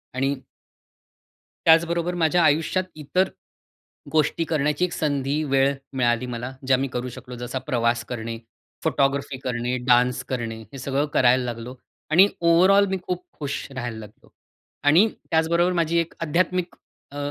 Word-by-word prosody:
आणि 135 +2 0 1.3
त्याचबरोबर 170 +2 +4
माझ्या 170 0 +3
आयुष्यात 160 +5 +2
इतर 180 +5 0 0.8
गोष्टी 155 +1 +1
करण्याची 150 +2 +1
एक 175 - -6
संधी 145 0 -1
वेळ 135 0 +2 0.2
मिळाली 120 -1 +1
मला 125 +1 -5 0.2
ज्या 130 -1 +4
मी 135 +1 -1
करू 125 0 -4
शकलो. 125 0 -10
जसा 120 +2 -4
प्रवास 120 -2 0
करणे, 115 -1 -4 0.5
फोटोग्राफी 135 0 0
करणे, 125 0 -1
डान्स 125 +1 +3
करणे, 115 -3 -3
हे - - -7
सगळं 140 +3 0
करायला 125 0 +4
लागलो 120 +1 -6 0.4
आणि 185 +5 +7
ओव्हरऑल 185 +4 +5
मी 190 - 0
खूप 180 0 -2 0.2
खुश 140 -2 -4
राहायला 120 -3 -4
लागलो. 105 -1 -14 0.5
आणि 165 +10 +6 0.2
त्याचबरोबर 170 +2 +2
माझी 165 +1 0
एक 165 - -2
आध्यात्मिक 180 +2 0 0.4
अ, 145 - -9
140 Hz, 140 wpm, -24 LUFS, 125-165 Hz, 1.3 s, आणि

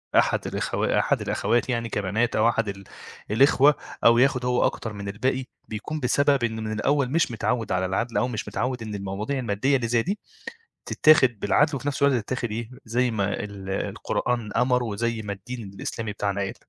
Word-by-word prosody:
أحد - - +3
الأخوا - - 0
أحد - - +1
الأخوات 120 +2 0
يعني 115 -2 -1
كبنات 105 +4 0
أو 110 +2 +4
أحد 115 -2 0
ال 100 0 -7 0.5
الإخوة 140 +4 +5 0.3
أو 115 0 +7
ياخد 125 -1 +3
هو 125 0 +2
أكتر 110 -2 -2
من 100 -1 -7
الباقي، 130 +5 -1 0.2
بيكون 110 +9 -5
بسبب 140 0 +2
إن 110 -1 -2
من 110 - -3
الأول 135 +4 +1
مش 165 -4 +2
متعوّد 115 +1 -1
على 95 0 +1
العدل 110 +4 -1
أو 120 - +2
مش 115 -4 -4
متعوّد 125 -1 -2
إن 105 -2 -5
المواضيع 100 +7 -3
المادّية 125 +4 +1
اللي 125 -3 0
زي 115 0 +2
دي 200 +4 -2 0.7
تتّاخِد 130 -8 +4
بالعدل 150 -1 +2
وفي 135 +3 -3
نفس 140 - -3
الوقت 130 -6 +3
تتاخِد 125 0 -3
إيه، 115 +2 -4
زي 120 +2 +1
ما 100 -2 -1
ال 100 -2 -8
القرآن 115 +3 -2
أمَر 125 +1 +2
وزي 115 +1 -2
ما 105 -1 -4
الدين 105 +1 -7
الإسلامي 105 +2 -4
بتاعنا 100 -1 -2
قال. 95 - -2
115 Hz, 185 wpm, -25 LUFS, 105-130 Hz, 0.7 s, أو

